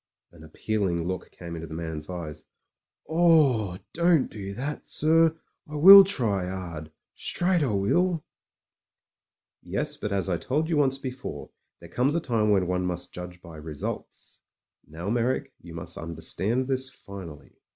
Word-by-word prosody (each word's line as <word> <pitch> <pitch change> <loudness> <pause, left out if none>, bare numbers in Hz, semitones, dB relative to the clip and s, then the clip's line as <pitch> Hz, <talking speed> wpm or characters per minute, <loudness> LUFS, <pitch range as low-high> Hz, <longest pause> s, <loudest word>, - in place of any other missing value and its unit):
An 85 -2 -16
appealing 90 +1 -2
look 95 0 -4
came 85 -1 -9
into 80 0 -7
the 80 - -8
man's 80 -1 -5
eyes. 85 -4 -7 0.6
"Oh! 150 - +3 0.2
don't 170 -4 +3
do 100 -2 -6
that, 140 +6 -5
sir. 160 +1 +3 0.3
I 150 - -7
will 195 +6 +11
try 110 - +1
'ard 85 -5 -6 0.2
— - - -65
^straight 175 -1 +1
I 135 -6 +1
will." 165 - +1 1.4
"Yes, - - -3
but 105 - -4
as 100 -1 0
I 90 -3 0
told 155 - -1
you 160 - +2
once 135 -2 +2
before, 130 - -7 0.3
there - - -12
comes 135 +5 0
a - - +2
time 115 -8 0
when 95 -3 +3
one 90 +1 -1
must 90 -1 -5
judge 90 0 -9
by 85 -3 -11
results. 75 -1 -7 0.5
Now, 85 +6 -5
Meyrick, 120 +2 -1
you - - -11
must - - -6
understand 100 +9 -2
this 130 -1 -1
finally. 95 - -11
105 Hz, 155 wpm, -26 LUFS, 85-145 Hz, 1.4 s, will